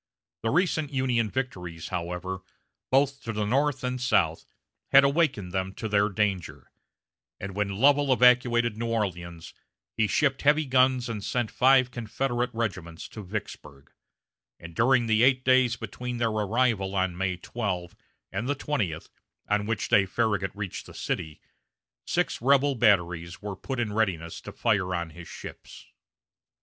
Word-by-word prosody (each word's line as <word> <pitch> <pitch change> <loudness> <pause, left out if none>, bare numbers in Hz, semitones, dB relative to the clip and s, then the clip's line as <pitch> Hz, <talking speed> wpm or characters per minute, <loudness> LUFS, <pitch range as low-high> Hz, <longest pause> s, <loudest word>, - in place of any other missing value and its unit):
The 115 - 0
recent 155 -1 +1
Union 125 -5 +1
victories, 90 -11 -5
however, 90 +1 -4 0.5
both 140 +1 +2
to 115 - -4
the 105 -1 -1
north 135 +4 +1
and 125 0 -2
south, 85 -10 +1 0.4
had 135 0 +8
awakened 140 - +1
them 95 0 -3
to 110 - -4
their 105 0 +2
danger; 95 -9 -2 0.7
and 95 0 -6
when 100 -1 -1
Lovell 140 +4 +4
evacuated 120 -2 +4
New 115 +1 -3
Orleans, 90 -7 -3 0.4
he 110 - +2
shipped 135 +6 +1
heavy 150 +2 +3
guns 130 -1 +3
and 110 -4 -5
sent 115 +2 -1
five 130 -1 +4
Confederate 120 +1 -2
regiments 90 -7 -4
to 110 - -9
Vicksburg; 75 -8 -7 0.7
and 85 0 -10
during 120 +5 +3
the 110 -1 +2
eight 130 +1 +4
days 130 -2 +4
between 120 +2 -6
their 115 -1 +1
arrival 105 -2 0
on 95 -2 0
May 95 0 -1
12 90 -4 -4 0.4
and 105 +7 -3
the 145 - +1
twentieth, 105 - -2 0.4
on 105 0 0
which 110 -2 -1
day 100 -1 +4
Farragut 100 -2 0
reached 100 -3 -6
the - - -13
city, 75 -1 -4 0.7
six - - 0
rebel 140 +2 +4
batteries 90 -7 +1
were 105 -1 -5
put 130 +7 -5
in 110 -3 -1
readiness 90 -7 -1
to - - -8
fire 100 -5 0
on 85 -1 -3
his 85 +1 -11
ships. - - -10
110 Hz, 150 wpm, -27 LUFS, 95-125 Hz, 0.7 s, had